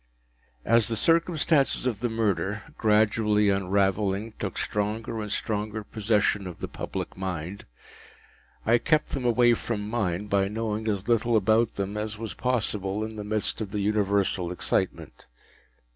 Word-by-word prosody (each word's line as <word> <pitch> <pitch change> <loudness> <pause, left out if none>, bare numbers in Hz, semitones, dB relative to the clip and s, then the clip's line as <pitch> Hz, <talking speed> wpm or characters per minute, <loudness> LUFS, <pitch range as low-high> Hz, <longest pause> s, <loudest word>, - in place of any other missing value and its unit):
As 115 -2 +4
the 115 - -1
circumstances 165 - +2
of 120 -6 -1
the 120 +1 -1
murder, 105 -2 -1
gradually 105 -1 +3
unravelling, 100 +2 0
took - - -4
stronger 110 +2 -2
and 105 -1 -5
stronger 105 0 -2
possession 105 -2 +1
of 90 - -8
the - - -5
public - - -5
mind, 95 0 -5 1.0
I 120 +2 +4
kept 155 +3 +2
them 130 -3 -3
away 120 0 +5
from 105 -3 -3
mine 100 -4 -1
by 100 -1 +1
knowing 110 +1 -3
as 100 -1 -1
little 115 0 +3
about 110 +2 +2
them 100 +1 -3
as 105 0 -3
was 110 -4 -5
possible 105 -2 -1
in 110 0 -5
the 105 - -5
midst 105 +1 -1
of 105 - -3
the 105 +1 -2
universal 100 -3 +1
excitement. 90 - -2
105 Hz, 145 wpm, -27 LUFS, 100-115 Hz, 1.0 s, away